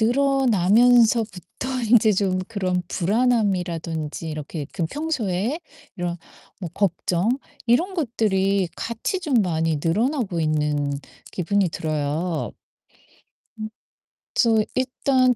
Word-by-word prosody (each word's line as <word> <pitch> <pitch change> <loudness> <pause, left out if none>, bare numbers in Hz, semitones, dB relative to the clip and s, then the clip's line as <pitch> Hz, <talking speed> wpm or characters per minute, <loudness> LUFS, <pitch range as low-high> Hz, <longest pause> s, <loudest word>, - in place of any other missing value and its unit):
늘어나면서부터 235 -4 +3 0.2
인제 220 -2 +6
좀 185 -1 +1
그런 185 -4 -1
불안함이라든지 180 -7 0
이렇게 150 0 -5
그 170 -4 -1
평소에 255 - -2 0.4
이런 175 -1 -2 0.4
뭐 175 - -4
걱정 185 0 0 0.4
이런 335 +12 +2
것들이 200 - +1
같이 230 - -3
좀 300 -6 -2
많이 165 -6 +1
늘어나고 210 - 0
있는 150 -2 0 0.4
기분이 195 +1 +1
들어요. 155 +1 -2 1.1
음. 215 0 -4 0.6
그래서 225 -2 +4
일단 255 -1 +2
200 Hz, 230 characters per minute, -23 LUFS, 170-240 Hz, 1.1 s, 인제